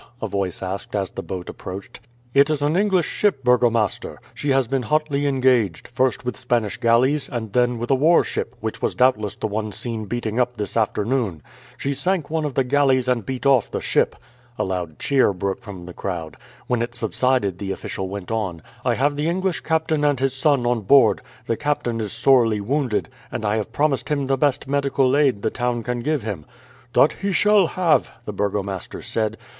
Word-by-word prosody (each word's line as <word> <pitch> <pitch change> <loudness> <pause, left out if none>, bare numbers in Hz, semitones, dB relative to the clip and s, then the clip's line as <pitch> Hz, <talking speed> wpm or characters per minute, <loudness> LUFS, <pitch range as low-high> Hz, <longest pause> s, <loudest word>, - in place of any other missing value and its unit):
a 110 - -3
voice 95 -2 -3
asked 95 +3 -5
as 100 -2 -1
the - - -5
boat 90 -2 -6
approached. 95 +2 -8 0.3
"It 140 +2 +5
is 150 -2 0
an 150 +3 +1
English 190 -3 +2
ship, 195 -11 0
burgomaster. 120 -4 +2 0.2
She 145 - -3
has 135 -1 +3
been 135 +3 -1
hotly 145 +3 0
engaged; 125 - +2
first 130 0 0
with 125 - -2
Spanish 120 -4 -1
galleys, 130 +5 +2
and 110 -4 -5
then 125 -1 +2
with 120 +3 -3
a - - +6
warship, 155 +6 +2
which - - -4
was - - -1
doubtless 110 -5 +2
the - - -4
one 110 0 -2
seen 110 +2 -5
beating 115 +1 -2
up 125 -1 0
this 105 -2 -4
afternoon. 110 - 0 0.3
She 140 - -2
sank 180 0 -1
one 160 -1 0
of 140 -4 -4
the 135 - +3
galleys 130 -1 +2
and 125 -3 +1
beat 130 0 -4
off 135 -5 +4
the - - -3
ship." - - +1 0.4
A - - 0
loud 90 -4 -3
cheer 135 -7 +2
broke 95 +1 -3
from 95 -4 -9
the 90 - -9
crowd. 85 -6 -5 0.3
When 125 -2 0
it 120 0 -3
subsided 110 -3 0
the 100 - -4
official 95 0 -4
went 100 -1 -6
on: 95 -8 -2 0.2
"I 125 -2 +2
have 145 +3 +1
the 150 +3 0
English 185 0 -1
captain 160 -2 0
and 145 -3 +2
his 135 0 +1
son 135 -2 +2
on 120 -1 +1
board. 115 -2 +5 0.2
The 115 - -1
captain 135 -6 -1
is 105 - -3
sorely 115 -2 +3
wounded, 125 +1 -1 0.2
and 110 - -4
I 105 +1 +1
have 110 0 -3
promised 145 +2 0
him 145 -2 0
the 135 0 +1
best 140 0 0
medical 140 -1 +2
aid 135 -8 +2
the - - +1
town 120 -2 -1
can 125 +2 -2
give 145 0 -1
him." 100 -9 -5 0.5
"That - - +5
he 200 - -3
shall 205 -1 +4
have," 170 -4 +2
the 105 - -5
burgomaster 100 -3 -3
said. 110 0 -1
125 Hz, 200 wpm, -22 LUFS, 105-140 Hz, 0.5 s, a